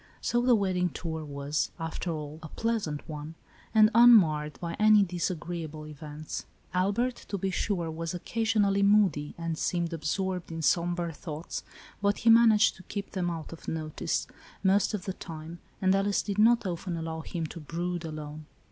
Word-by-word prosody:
So 240 Hz, -, +1 dB
the 245 Hz, -1 st, +5 dB
wedding 185 Hz, -3 st, +1 dB
tour 160 Hz, -2 st, -5 dB
was, 145 Hz, +1 st, -2 dB
after 165 Hz, +2 st, -4 dB
all, 155 Hz, -1 st, -5 dB
a 160 Hz, -, -7 dB
pleasant 210 Hz, -7 st, -2 dB
one, 155 Hz, +1 st, -7 dB, 0.4 s
and 215 Hz, -1 st, +6 dB
unmarred 175 Hz, -11 st, +6 dB
by 170 Hz, -1 st, -4 dB
any 215 Hz, -1 st, +7 dB
disagreeable 170 Hz, -3 st, -3 dB
events. 150 Hz, 0 st, -7 dB, 0.3 s
Albert, 205 Hz, +7 st, +1 dB
to 200 Hz, -, -2 dB
be 190 Hz, +1 st, -1 dB
sure, 175 Hz, -4 st, -1 dB
was 165 Hz, +2 st, -4 dB
occasionally 210 Hz, 0 st, +1 dB
moody, 200 Hz, -8 st, +3 dB
and 165 Hz, -1 st, -3 dB
seemed 170 Hz, -1 st, -1 dB
absorbed 180 Hz, +3 st, -2 dB
in 165 Hz, 0 st, -4 dB
sombre 175 Hz, 0 st, +1 dB
thoughts, 155 Hz, 0 st, -6 dB, 0.4 s
but 200 Hz, 0 st, +2 dB
he 230 Hz, -, +5 dB
managed 225 Hz, -2 st, +6 dB
to 185 Hz, -, -13 dB
keep 200 Hz, -1 st, -4 dB
them 180 Hz, -2 st, -1 dB
out 165 Hz, -1 st, -5 dB
of 165 Hz, -, -12 dB
notice, 155 Hz, -1 st, -2 dB, 0.4 s
most 200 Hz, +3 st, +3 dB
of 185 Hz, -, -6 dB
the 190 Hz, -, -2 dB
time, 165 Hz, -1 st, -8 dB, 0.2 s
and 190 Hz, 0 st, +5 dB
Alice 195 Hz, +1 st, +1 dB
did 205 Hz, -1 st, -3 dB
not 230 Hz, +1 st, +5 dB
often 175 Hz, -1 st, -3 dB
allow 160 Hz, 0 st, -4 dB
him 165 Hz, 0 st, -4 dB
to 160 Hz, -, -7 dB
brood 175 Hz, +3 st, -3 dB
alone. 155 Hz, -1 st, -7 dB
175 Hz, 165 wpm, -29 LUFS, 160-200 Hz, 0.4 s, any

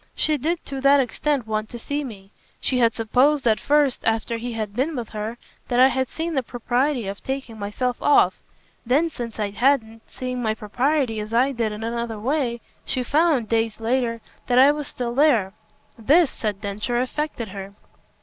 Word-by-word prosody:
She 310 Hz, -, +2 dB
did 325 Hz, +5 st, -2 dB
to 270 Hz, -1 st, -5 dB
that 280 Hz, +1 st, +6 dB
extent 270 Hz, +1 st, 0 dB
want 215 Hz, 0 st, -2 dB
to 240 Hz, -, -7 dB
see 285 Hz, +5 st, -3 dB
me. 200 Hz, -6 st, -10 dB, 0.3 s
She 255 Hz, -, 0 dB
had 230 Hz, -2 st, +3 dB
supposed 260 Hz, +5 st, +2 dB
at 220 Hz, -1 st, +3 dB
first 290 Hz, -3 st, +2 dB
after 225 Hz, +1 st, 0 dB
he 240 Hz, +1 st, -5 dB
had 215 Hz, -2 st, -4 dB
been 285 Hz, +6 st, 0 dB
with 240 Hz, -4 st, -4 dB
her 215 Hz, +2 st, -5 dB, 0.3 s
that 245 Hz, -, +1 dB
I 260 Hz, +1 st, +8 dB
had 260 Hz, 0 st, 0 dB
seen 330 Hz, +1 st, -3 dB
the 270 Hz, -, +1 dB
propriety 245 Hz, +1 st, -1 dB
of 195 Hz, +1 st, -5 dB
taking 265 Hz, -5 st, -5 dB
myself 240 Hz, +5 st, -2 dB
off. 290 Hz, -, +4 dB, 0.4 s
Then 290 Hz, +7 st, +2 dB
since 235 Hz, -5 st, -6 dB
I 205 Hz, -1 st, -1 dB
hadn't 225 Hz, 0 st, +1 dB
seeing 250 Hz, -1 st, -4 dB
my 220 Hz, -2 st, 0 dB
propriety 250 Hz, +2 st, 0 dB
as 215 Hz, +2 st, -4 dB
I 260 Hz, +4 st, +4 dB
did 230 Hz, -4 st, -1 dB
in 210 Hz, +1 st, -6 dB
another 235 Hz, -1 st, -3 dB
way 245 Hz, -1 st, -1 dB, 0.2 s
she 255 Hz, -2 st, -2 dB
found, 290 Hz, -3 st, +2 dB
days 225 Hz, -1 st, 0 dB
later, 230 Hz, 0 st, 0 dB, 0.3 s
that 245 Hz, -, +2 dB
I 270 Hz, +3 st, +8 dB
was 295 Hz, -1 st, -4 dB
still 240 Hz, -1 st, -4 dB
there. 240 Hz, -9 st, +3 dB, 0.5 s
This," 295 Hz, +7 st, +4 dB
said 210 Hz, -2 st, -4 dB
Densher, 210 Hz, +4 st, -2 dB
"affected 255 Hz, -3 st, -3 dB
her." 195 Hz, +1 st, -8 dB
245 Hz, 190 wpm, -23 LUFS, 225-275 Hz, 0.5 s, I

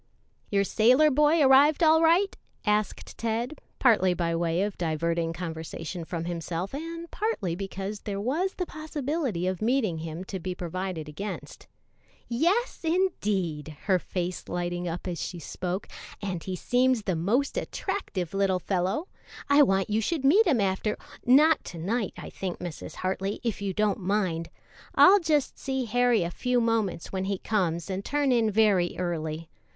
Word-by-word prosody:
"Your 200 Hz, -1 st, +2 dB
sailor 255 Hz, +9 st, +4 dB
boy 300 Hz, +3 st, +4 dB
arrived 280 Hz, +4 st, +6 dB
all 320 Hz, 0 st, +6 dB
right?" 345 Hz, +5 st, +4 dB, 0.3 s
asked 210 Hz, -1 st, -1 dB
Ted, 235 Hz, +5 st, -2 dB, 0.2 s
partly 190 Hz, -8 st, +4 dB
by 170 Hz, -1 st, 0 dB
way 170 Hz, +2 st, +1 dB
of 205 Hz, -1 st, -2 dB
diverting 165 Hz, 0 st, 0 dB
conversation 165 Hz, 0 st, -5 dB
from 165 Hz, 0 st, -4 dB
himself 175 Hz, +3 st, -4 dB
and 330 Hz, +3 st, -6 dB
partly 305 Hz, -, -1 dB
because 195 Hz, +2 st, -5 dB
there 200 Hz, -2 st, -4 dB
was 310 Hz, -, -1 dB
the 360 Hz, -, -2 dB
possibility 295 Hz, -, -3 dB
of 185 Hz, -1 st, -2 dB
meeting 220 Hz, -8 st, +1 dB
him 165 Hz, +2 st, -5 dB
to 190 Hz, 0 st, -5 dB
be 180 Hz, +1 st, -4 dB
provided 180 Hz, -2 st, -4 dB
against. 195 Hz, +8 st, -7 dB, 0.6 s
"Yes, 350 Hz, -, +1 dB
indeed," 200 Hz, -, -1 dB
her 190 Hz, -2 st, +3 dB
face 180 Hz, 0 st, -4 dB
lighting 175 Hz, 0 st, -2 dB
up 170 Hz, +2 st, -4 dB
as 175 Hz, -2 st, -3 dB
she 180 Hz, -, -4 dB
spoke; 180 Hz, +3 st, -4 dB, 0.3 s
"and 185 Hz, -5 st, -4 dB
he 185 Hz, -, -3 dB
seems 250 Hz, +4 st, +2 dB
the 185 Hz, -3 st, 0 dB
most 220 Hz, -, +1 dB
attractive 195 Hz, -, -3 dB
little 195 Hz, -1 st, +2 dB
fellow. 190 Hz, -, -1 dB, 0.4 s
I 285 Hz, +1 st, +6 dB
want 195 Hz, -6 st, +3 dB
you 215 Hz, +2 st, +2 dB
should 280 Hz, +4 st, -1 dB
meet 385 Hz, +11 st, +6 dB
him 275 Hz, -8 st, +3 dB
after 200 Hz, +2 st, 0 dB, 0.2 s
" -, -, -31 dB
"Not 300 Hz, +5 st, +6 dB
to 175 Hz, -, -8 dB
night, 200 Hz, +5 st, -1 dB
I -, -, -8 dB
think, 185 Hz, -2 st, -4 dB
Mrs. 175 Hz, -3 st, -7 dB
Hartley, 190 Hz, +2 st, -2 dB
if 230 Hz, -4 st, -2 dB
you 200 Hz, -1 st, -1 dB
don't 210 Hz, +2 st, +1 dB
mind. 185 Hz, -4 st, -1 dB, 0.5 s
I'll 400 Hz, +2 st, +8 dB
just 305 Hz, -5 st, 0 dB
see 265 Hz, -2 st, -2 dB
Harry 245 Hz, -3 st, +3 dB
a 170 Hz, -, -3 dB
few 250 Hz, +5 st, 0 dB
moments 225 Hz, -7 st, 0 dB
when 190 Hz, 0 st, -2 dB
he 195 Hz, 0 st, -1 dB
comes 175 Hz, -6 st, -1 dB
and 195 Hz, 0 st, -3 dB
turn 285 Hz, +1 st, +1 dB
in 230 Hz, -3 st, +3 dB
very 205 Hz, -4 st, +3 dB
early. 165 Hz, -2 st, -3 dB
200 Hz, 165 wpm, -27 LUFS, 175-265 Hz, 0.6 s, I'll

